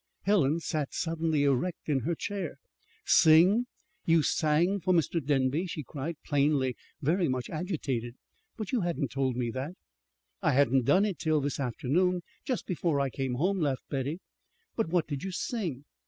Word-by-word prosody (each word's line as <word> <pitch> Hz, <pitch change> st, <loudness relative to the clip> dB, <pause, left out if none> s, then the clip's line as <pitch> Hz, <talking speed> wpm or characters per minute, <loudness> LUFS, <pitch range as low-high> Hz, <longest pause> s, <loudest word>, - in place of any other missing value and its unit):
Helen 170 Hz, -6 st, +3 dB
sat 155 Hz, -4 st, -3 dB
suddenly 160 Hz, -3 st, 0 dB
erect 140 Hz, +6 st, 0 dB
in 145 Hz, -3 st, +2 dB
her 165 Hz, +7 st, -1 dB
chair. 195 Hz, -4 st, -4 dB, 0.5 s
"Sing? 180 Hz, +10 st, +6 dB, 0.4 s
You 165 Hz, -3 st, +4 dB
sang 170 Hz, +7 st, +2 dB
for 185 Hz, 0 st, +2 dB
Mr. 165 Hz, 0 st, +1 dB
Denby?" 140 Hz, +5 st, +1 dB
she 155 Hz, -3 st, -5 dB
cried, 150 Hz, +5 st, -5 dB
plainly 140 Hz, -3 st, +2 dB, 0.3 s
very 170 Hz, +5 st, +2 dB
much 130 Hz, -1 st, -2 dB
agitated. 140 Hz, -, -3 dB, 0.4 s
"But 215 Hz, -4 st, -5 dB
you 245 Hz, -, +1 dB
hadn't 170 Hz, -5 st, -1 dB
told 135 Hz, -2 st, 0 dB
me 120 Hz, -1 st, -1 dB
that!" 135 Hz, +8 st, -5 dB, 0.7 s
"I -, -, +2 dB
hadn't 135 Hz, -2 st, +3 dB
done 190 Hz, -, +4 dB
it 190 Hz, -8 st, -3 dB
till 155 Hz, -2 st, +2 dB
this 145 Hz, 0 st, -2 dB
afternoon, 160 Hz, +8 st, 0 dB, 0.2 s
just 255 Hz, -4 st, -2 dB
before 170 Hz, -5 st, 0 dB
I 135 Hz, -1 st, 0 dB
came 130 Hz, -2 st, -2 dB
home," 185 Hz, +8 st, +1 dB
laughed 140 Hz, -5 st, -1 dB
Betty. 140 Hz, +4 st, -2 dB, 0.6 s
"But 225 Hz, -8 st, 0 dB
what 175 Hz, -1 st, +2 dB
did 145 Hz, -3 st, -4 dB
you 195 Hz, -, -3 dB
sing? 175 Hz, -, -3 dB
155 Hz, 165 wpm, -29 LUFS, 135-180 Hz, 0.7 s, Sing